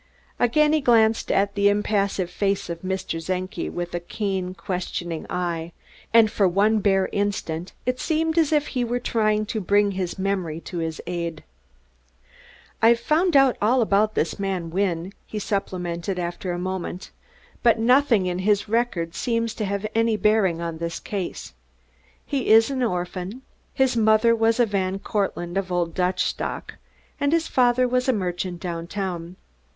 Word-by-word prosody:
Again 300 +6 +3
he 310 - +3
glanced 225 -3 +3
at 200 +1 +2
the 200 0 +3
impassive 200 -3 0
face 195 -2 -1
of 170 0 -6
Mr. 185 -3 -3
Czenki 185 +3 -3
with 175 0 -5
keen, 190 -3 -2
questioning 175 -4 -4
eyes; 170 -2 -3 0.4
and 225 -2 +6
for 200 - +3
one 205 +4 +3
bare 195 -2 +2
instant 195 -4 -2
it 255 0 -1
seemed 320 0 0
as 320 -2 +2
if 300 -1 +2
he 250 -2 -1
were 240 +1 -1
trying 215 -3 +1
to 215 +1 -3
bring 205 +2 +3
his 185 -1 -3
memory 190 -5 -2
to 175 - -6
his 160 -1 -3
aid. 170 -2 -4 1.4
"I've 230 +1 +5
found 315 +5 +3
out 270 -2 +4
all 235 +5 +3
about 215 +1 +2
this 160 - -1
man 190 -4 -2
Wynne," 185 0 -1
he 215 - -6
supplemented 185 -3 -3
after 175 +1 -3
a 175 - -2
moment, 185 0 -4 0.5
"but 235 -1 +4
nothing 235 -3 +4
in 180 0 -2
his 205 +2 +1
record 210 -7 0
seems 230 -2 -1
to 215 - -3
have 200 +1 -2
any 225 -1 +2
bearing 205 -4 +2
on 165 -1 -4
this 170 0 -3
case. 190 - -5 0.7
He 275 -4 -2
is 225 +4 +6
an 265 -1 -2
orphan. 185 +2 -3 0.3
His 265 -2 +1
mother 220 +1 +4
was 225 +1 +2
a 240 - +5
Van 195 -2 -1
Cortlandt 195 -3 -2
of 190 -2 -2
old 175 -2 0
Dutch 180 0 +1
stock, - - -4 0.4
and 285 0 +1
his 330 0 +2
father 250 0 +3
was 250 +1 0
a - - +4
merchant 180 -3 -3
downtown. 175 0 -4
200 Hz, 160 wpm, -24 LUFS, 180-230 Hz, 1.4 s, and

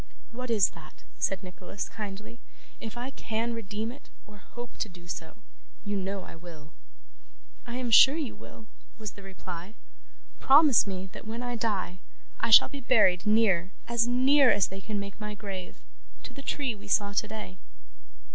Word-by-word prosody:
'What 250 +1 -6
is 210 -5 +4
that?' 160 -4 -15 0.2
said 195 0 0
Nicholas, 185 +2 -6
kindly. 210 +2 -7 0.4
'If 225 +1 -7
I 250 +3 -4
can 230 -1 -3
redeem 220 0 -4
it, 270 - -15 0.2
or 210 0 -14
hope 240 +5 -10
to 215 - -2
do 175 -1 -14
so, 165 +2 -7 0.5
you 205 0 -2
know 195 0 -3
I - - -11
will.' 160 -3 -12 0.9
'I 240 - -5
am 250 -2 -2
sure 270 +7 +8
you 295 -8 -3
will,' 225 - -13 0.3
was 215 -3 -5
the 200 - -13
reply. 190 0 -8 0.6
'Promise 275 -5 +6
me 190 -1 -4
that - - -10
when 230 +2 -4
I 245 0 -3
die, 205 -5 -2 0.4
I - - 0
shall 220 - +9
be 280 - -7
buried 215 -6 +4
near 205 -5 +3 0.2
as 235 0 +2
near 260 +2 +5
as 200 - +3
they 195 +1 -7
can 210 0 -3
make 200 +1 -7
my 210 0 -4
grave 195 -3 -7 0.5
to - - -9
the 275 - -9
tree 275 -3 -1
we 205 -1 -12
saw 200 0 +2
today. 210 -3 -3
210 Hz, 175 wpm, -28 LUFS, 190-235 Hz, 0.9 s, shall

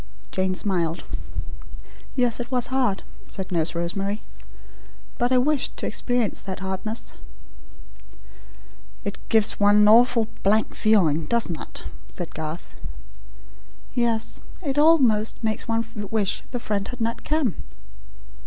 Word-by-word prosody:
Jane 185 0 0
smiled. 175 -4 0 1.1
"Yes, 245 -3 +2
it 240 - -4
was 255 0 +1
hard," 245 -7 +1 0.2
said 190 -2 -5
Nurse 170 -1 +1
Rosemary; 195 +5 -2 1.0
"but 245 0 +2
I 255 - +5
wished 280 +2 +1
to - - -3
experience 245 -4 -1
that 190 -1 -6
hardness." 190 +4 -3 1.9
"It 200 0 -4
gives 220 -2 +4
one 205 0 +5
an 210 0 +6
awful 230 +1 +6
blank 215 +2 +2
feeling, 165 -8 +3
doesn't 225 -9 0
it?" - - -7 0.2
said 175 -2 -7
Garth. 160 +2 -6 1.2
"Yes. 235 -2 0 0.2
It 285 -2 0
almost 255 -10 +4
makes 220 +1 -1
one 230 0 0 0.2
wish 205 -3 +1
the 245 - -3
friend 205 -3 -2
had 250 - -7
not 230 0 -2
come." 300 - 0
220 Hz, 125 wpm, -24 LUFS, 190-245 Hz, 1.9 s, an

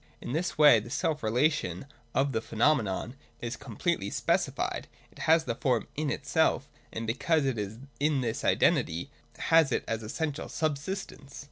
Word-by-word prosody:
In - - -6
this 170 +5 -1
way 145 -6 +8
the 110 +3 -9
self 150 +3 -1
relation 115 - +1 0.3
of 135 +1 +2
the 110 - -1
phenomenon 115 -2 +1 0.2
is 120 +1 -4
completely - - -2
speci - - +1
fied, - - -3 0.2
it - - -17
has 160 0 +6
the 120 - -2
Form 120 0 0
in 150 0 -1
itself: - - +1 0.2
and 115 - -4
because 140 +6 +1
it 130 -5 0
is 105 +1 -4 0.2
in 145 -2 +2
this 115 -3 -2
identity, 80 +2 +2 0.3
has 160 -4 +4
it - - 0
as 115 0 -2
essential 145 +7 -3
subsistence. 150 -2 -4
135 Hz, 160 wpm, -29 LUFS, 115-155 Hz, 0.3 s, way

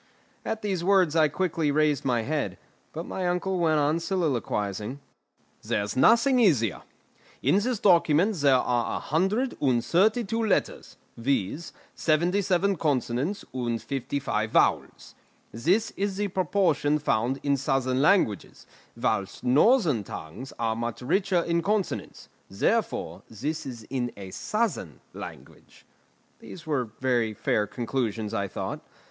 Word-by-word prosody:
At 220 -1 -4
these 190 -4 -1
words 185 -4 +3
I 155 -2 +5
quickly 165 -1 -1
raised 150 -1 +2
my 120 -3 +1
head; 150 +3 -2 0.3
but 165 +2 -6
my 185 -1 -3
uncle 180 +1 -1
went 160 -2 +3
on 150 +3 +2
soliloquising. 130 - -2 0.6
"There's 105 0 -2
nothing 235 - +5
easier. 140 - +2 0.6
In 195 - +4
this 240 +3 -1
document 175 +1 +3
there 140 -3 +4
are 120 -2 0
a - - -2
hundred 195 - 0
and 125 -5 +2
thirty 215 +7 +3
two 225 +2 -2
letters, 215 - -1 0.2
viz., 135 - -1 0.2
seventy 175 +5 +1
seven 190 +1 +1
consonants 145 - -1
and 120 -3 -2
fifty 135 +3 -3
five 110 -5 -1
vowels. - - +1 0.4
This 180 - +1
is 195 -1 -3
the 205 0 -1
proportion 175 -5 +1
found 130 -2 0
in 140 -1 +2
southern 130 -1 0
languages, 150 - +1 0.3
whilst 100 -5 -1
northern 150 - +4
tongues 100 +9 -8
are 115 -1 0
much 120 0 -4
richer 185 +4 +1
in 170 0 0
consonants; 205 +2 -2 0.2
therefore - - -1
this 145 +7 -4
is 120 -4 -7
in 125 -3 -1
a 95 -2 -8
southern 170 - -2
language." - - -11 0.5
These 170 - -11
were 145 -5 0
very 120 -4 +1
fair 105 +1 0
conclusions, 115 -3 -3
I 100 - -1
thought. - - -5
150 Hz, 135 wpm, -26 LUFS, 120-185 Hz, 0.6 s, I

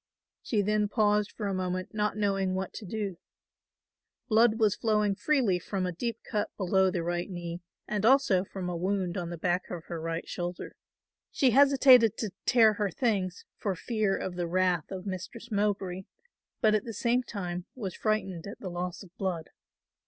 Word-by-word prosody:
She 210 -4 0
then 210 +1 +2
paused 210 -1 +2
for 210 - -5
a 200 - -1
moment 185 0 -3
not 210 -1 0
knowing 195 -2 +1
what 190 -1 -3
to 215 - -7
do. 200 -3 -3 1.1
Blood 225 0 +5
was 215 -3 +4
flowing 210 -2 +2
freely 235 -6 +2
from 185 +1 -3
a 180 - -1
deep 230 +6 -3
cut 210 -1 -2
below 190 0 +3
the 175 -2 -2
right 175 +2 -2
knee 175 -1 -5 0.3
and 210 -1 -2
also 230 -7 +4
from 190 -2 -6
a 180 - -2
wound 185 0 -1
on 175 -3 -3
the 170 - -5
back 175 +2 -1
of 170 -3 -5
her 170 -2 -5
right 165 +1 -3
shoulder. 175 0 -5 0.6
She 260 -3 +3
hesitated 260 -4 +6
to 215 -4 -3 0.2
tear 225 -3 +6
her 205 -1 -1
things 195 -4 -1
for 195 -3 -1
fear 210 +2 0
of 185 - -4
the 175 -1 -1
wrath 180 -2 +1
of 190 -1 -6
Mistress 200 +5 -6
Mowbray, 195 -3 -1 0.6
but 215 -1 +4
at 215 -1 +2
the 230 -2 -7
same 240 +1 +2
time 180 -7 -5
was 200 -8 -4
frightened 200 -5 -1
at 200 - -8
the 185 - -5
loss 175 +2 -4
of 180 -2 -17
blood. 180 -5 -3
195 Hz, 180 wpm, -29 LUFS, 180-215 Hz, 1.1 s, hesitated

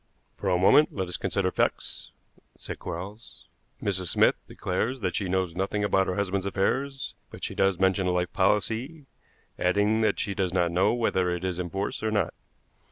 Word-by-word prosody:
"For 100 - -2
a 90 - +3
moment 120 +11 +5
let 95 -3 -2
us 90 - -1
consider 95 -2 0
facts," - - -1 0.5
said - - -7
Quarles. 100 +7 -8 0.4
"Mrs. 95 -3 -1
Smith - - +4
declares 125 +2 -2
that 90 -3 -1
she 100 -4 -1
knows 95 -2 0
nothing 100 +2 -1
about 95 -2 +2
her 90 - -1
husband's 100 -1 -1
affairs, 135 +8 -1 0.2
but - - -11
she - - -2
does 95 -2 +2
mention 95 0 +2
a - - +2
life 90 0 -1
policy, 110 - 0 0.5
adding 105 +5 +2
that 110 - +2
she 100 - -1
does 95 -2 -1
not 85 -2 +2
know 95 +4 +3
whether 110 -6 +1
it 90 0 -2
is 90 -1 -2
in 90 -1 -3
force 95 +3 -3
or 110 - 0
not. 105 -4 0
95 Hz, 185 wpm, -27 LUFS, 90-105 Hz, 0.5 s, moment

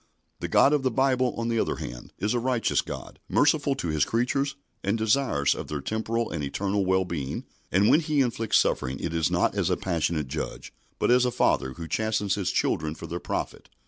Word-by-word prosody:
The - - -3
God 140 - +5
of 150 - +2
the 130 - +1
Bible, 130 0 +1
on 115 0 -2
the 115 -1 +1
other - - 0
hand, - - -8
is 105 +4 0
a 120 - +1
righteous 125 -1 +1
God, - - -8
merciful 145 -1 +3
to 90 -10 -3
His 75 -2 +2
creatures, 135 - 0 0.3
and 100 +4 +1
desirous 110 - +2
of - - -6
their 75 - -3
temporal 110 +8 -2
and 75 -3 -3
eternal 100 +8 -1
wellbeing, 90 -7 -1 0.3
and 100 +3 +4
when 150 - +6
He 155 -3 +1
inflicts 115 -3 +1
suffering 65 +2 0
it 85 - -3
is 80 -2 +1
not - - +2
as - - 0
a - - +1
passionate 85 -4 -1
Judge, - - -5 0.2
but - - +2
as 125 0 +5
a 125 - +2
Father 65 - +1
who 85 +2 -7
chastens 110 0 0
His 100 -3 -1
children 75 0 0
for - - -8
their 85 - -4
profit. - - -4
105 Hz, 210 wpm, -26 LUFS, 85-125 Hz, 0.3 s, when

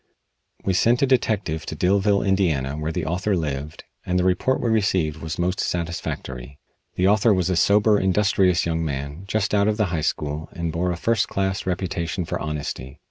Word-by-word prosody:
We 95 - +2
sent 120 +7 +3
a - - +6
detective 105 - 0
to - - -4
Dillville, 100 +5 +2
Indiana, 85 -9 +1
where 75 +1 -3
the - - -3
author 90 +4 0
lived, 75 -2 -4 0.2
and 90 - -1
the 90 - +2
report 95 +8 +1
we 120 - -1
received 95 -8 +1
was 80 -1 -5
most 90 +2 -1
satisfactory. 70 -6 -4 0.4
The 90 - +2
author 105 +1 +4
was 90 0 0
a - - +1
sober, 105 +4 +4
industrious 95 -2 +2
young 80 -1 -1
man, 70 +4 -4
just 105 0 -1
out 100 0 +3
of 105 -1 +1
the 105 - +2
high 80 - 0
school, 75 +2 -2
and 85 -1 -3
bore 85 +3 -1
a 85 - -3
first 110 +4 +1
class 95 -1 -2
reputation 90 -1 -2
for - - -3
honesty. 70 -2 -5
90 Hz, 190 wpm, -23 LUFS, 80-100 Hz, 0.4 s, a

